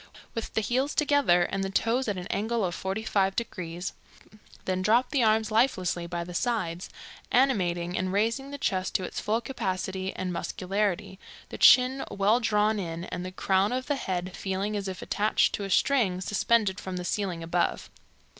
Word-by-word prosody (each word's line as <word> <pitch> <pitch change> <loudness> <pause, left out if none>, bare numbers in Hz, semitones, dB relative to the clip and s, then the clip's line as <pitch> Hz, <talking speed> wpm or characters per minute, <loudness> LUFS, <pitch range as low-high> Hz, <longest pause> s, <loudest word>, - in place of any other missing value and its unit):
With 230 - -5
the 220 - +2
heels 260 +6 0
together 285 - +3
and 195 +2 -2
the 195 - -2
toes 230 +6 +1
at 205 -3 -1
an 180 - -5
angle 220 +1 0
of 175 - -2
forty 190 +4 -3
five 195 -3 +1
degrees. 180 -5 -4 0.7
Then 185 0 -1
drop 230 +6 +3
the 280 - +2
arms 220 -1 +2
lifelessly 185 -7 +1
by 170 0 -3
the 175 +1 -9
sides, 185 -4 -2 0.4
animating 180 -9 +2
and 185 0 -1
raising 230 +7 0
the 285 - -6
chest 185 -8 -1
to 185 - +1
its - - -4
full 220 +3 0
capacity 190 -6 -3
and 185 -1 -3
muscularity, 195 +2 -2 0.3
the - - -8
chin 255 +1 +6
well 205 +4 +2
drawn 215 -2 +2
in, 170 -2 -4
and 180 0 -5
the 185 - -5
crown 190 +2 +1
of 255 +1 -2
the 290 - 0
head 185 -6 -3
feeling 195 +2 -2
as 200 -1 -3
if 185 -1 -5
attached 210 +1 +2
to 200 - -3
a - - -5
string 200 -4 +2
suspended 200 +1 +1
from 185 -1 -5
the 180 - -4
ceiling 180 -3 -2
above. 170 +1 -1
195 Hz, 185 wpm, -27 LUFS, 185-230 Hz, 0.7 s, chin